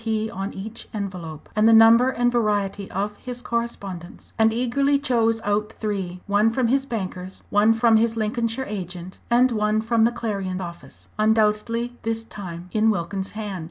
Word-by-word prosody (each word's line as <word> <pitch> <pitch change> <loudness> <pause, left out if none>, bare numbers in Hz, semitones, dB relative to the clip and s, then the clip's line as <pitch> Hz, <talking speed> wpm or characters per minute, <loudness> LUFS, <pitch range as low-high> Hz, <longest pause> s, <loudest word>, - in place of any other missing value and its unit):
P. 220 0 -1
on 195 -1 -4
each 220 +4 -7
envelope 180 -7 -6
and 215 +1 +5
the - - +6
number 225 +3 +7
and 245 -1 +1
variety 205 -4 0
of 205 +2 -3
his 245 -1 -7
correspondence 200 -7 -5
and 220 0 +4
eagerly 255 +5 +1
chose 230 -5 +1
out 210 +1 -1
three 190 -4 -4
one 205 +2 +3
from 235 0 0
his 270 +2 +1
bankers, 190 -5 -5
one 205 +2 +5
from 225 0 +4
his 225 +1 +1
Lincolnshire 230 +3 -1
agent, 185 -2 -6
and 245 +2 +4
one 215 -1 +1
from 225 0 +2
the 235 - +3
Clarion 200 -6 -3
office, 170 -2 -9
undoubtedly 220 +2 +1
this 225 0 -2
time 180 -5 -8
in 220 +1 +3
Wilkins's 190 0 -2
hand. 205 -3 -5
220 Hz, 165 wpm, -23 LUFS, 195-230 Hz, -, number